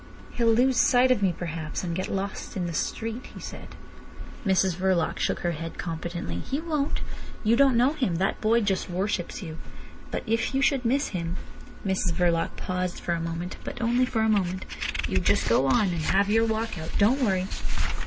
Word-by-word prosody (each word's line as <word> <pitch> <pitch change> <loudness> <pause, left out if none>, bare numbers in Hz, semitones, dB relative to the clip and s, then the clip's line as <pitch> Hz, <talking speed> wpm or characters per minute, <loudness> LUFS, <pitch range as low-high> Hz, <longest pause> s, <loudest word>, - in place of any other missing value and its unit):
"He'll 230 -1 +2
lose 250 +2 +3
sight 255 +1 +5
of 240 -5 +3
me 190 -2 +3
perhaps, 165 -2 -4
and 170 -2 -2
get 185 - -2
lost 195 +1 -4
in 180 - -1
the 170 - -3
street," 225 +9 -3
he - - -7
said. - - -9 0.7
Mrs 190 -3 +2
Verloc 185 -2 +1
shook - - 0
her 175 - 0
head 165 0 -6
competently. 170 +1 -4
"He 275 - -3
won't. 305 -3 -1 0.4
You 225 +1 +4
don't 270 -1 +5
know 255 +5 +4
him. 255 - 0
That 190 +3 0
boy 230 +2 +4
just 195 -3 0
worships 185 +1 -2
you. 160 -2 -7 0.5
But - - -3
if 230 +4 0
you 270 - +2
should 270 -3 +2
miss 275 +5 +2
him—" 170 -2 -3 0.5
Mrs 190 -3 +1
Verloc 170 -1 +1
paused 180 -1 -2
for 170 - -1
a 165 - -1
moment, 165 +2 -4
but - - -6
only 240 +2 +2
for 225 -3 0
a 220 - +3
moment. 190 -3 +1 0.4
"You - - +1
just - - +2
go 135 - +3
on, 190 +9 +3
and 170 -2 -2
have 195 +5 +2
your 225 +1 +4
walk 220 -3 -2
out. 160 - -5
Don't 240 +7 +4
worry. 190 -5 +2
195 Hz, 195 wpm, -27 LUFS, 175-230 Hz, 0.7 s, sight